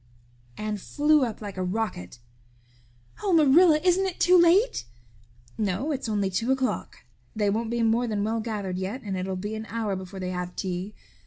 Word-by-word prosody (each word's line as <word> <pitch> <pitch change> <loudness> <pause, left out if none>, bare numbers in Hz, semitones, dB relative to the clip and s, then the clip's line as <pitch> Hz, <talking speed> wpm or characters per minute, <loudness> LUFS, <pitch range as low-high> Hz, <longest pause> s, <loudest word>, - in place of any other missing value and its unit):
Anne 215 0 -3
flew 295 +8 +2
up 230 -4 -3
like 200 -2 -7
a 185 - -1
rocket. 180 - -3 1.0
"Oh, 400 -3 +1
Marilla, 315 +1 +6
isn't 375 +1 +3
it 365 - -6
too 360 +1 +5
late?" 360 - +4 0.7
"No, 210 - -1
it's 270 -5 -3
only 200 -3 0
two 225 +7 0
o'clock. 265 -1 -2 0.3
They 205 -2 +1
won't 225 +2 -1
be 235 0 0
more 230 +2 +2
than 210 -2 -1
well 225 +2 -1
gathered 205 -5 -3
yet 205 +8 -4
and 200 -3 -3
it'll 185 +1 -3
be 205 +4 -4
an 220 0 -6
hour 215 -2 -2
before 190 +1 -8
they 185 -1 -3
have 180 0 -5
tea. 185 +2 -4
220 Hz, 180 wpm, -26 LUFS, 190-265 Hz, 1.0 s, Marilla